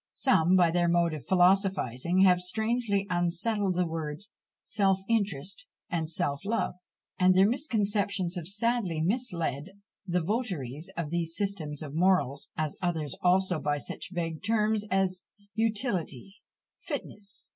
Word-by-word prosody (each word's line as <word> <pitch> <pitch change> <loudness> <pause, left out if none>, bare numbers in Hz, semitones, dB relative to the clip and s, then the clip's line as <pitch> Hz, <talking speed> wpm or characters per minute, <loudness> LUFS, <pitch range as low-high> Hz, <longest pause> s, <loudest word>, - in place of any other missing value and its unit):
Some, 185 -9 +3
by 175 -3 +5
their 175 0 +2
mode 170 -1 +2
of 145 -6 -7
philosophising, 185 - +3
have 180 -2 +5
strangely 220 +1 0
unsettled 180 +3 0
the 180 0 +2
words 160 +4 -5 0.3
self 195 -3 +1
interest 205 - -1 0.2
and 160 -2 -1
self 140 -2 -2
love; 220 +3 -1 0.5
and 185 0 +5
their 190 +2 +6
misconceptions 205 - 0
have 175 -4 -5
sadly 210 -4 0
misled 175 - -1 0.4
the 180 -1 0
votaries 175 - -3
of 165 -3 -3
these 170 -1 -1
systems 170 -8 -2
of 145 -2 -7
morals; 170 -5 +2
as 155 -2 -2
others 160 -6 -1
also 180 -1 +3
by 145 -1 0
such - - -7
vague 165 -3 -3
terms 215 -1 +1
as 185 -1 +1 0.3
"utility, 205 - -2 0.4
fitness," 200 -1 -6
&c. - - -28
185 Hz, 135 wpm, -29 LUFS, 165-205 Hz, 0.5 s, their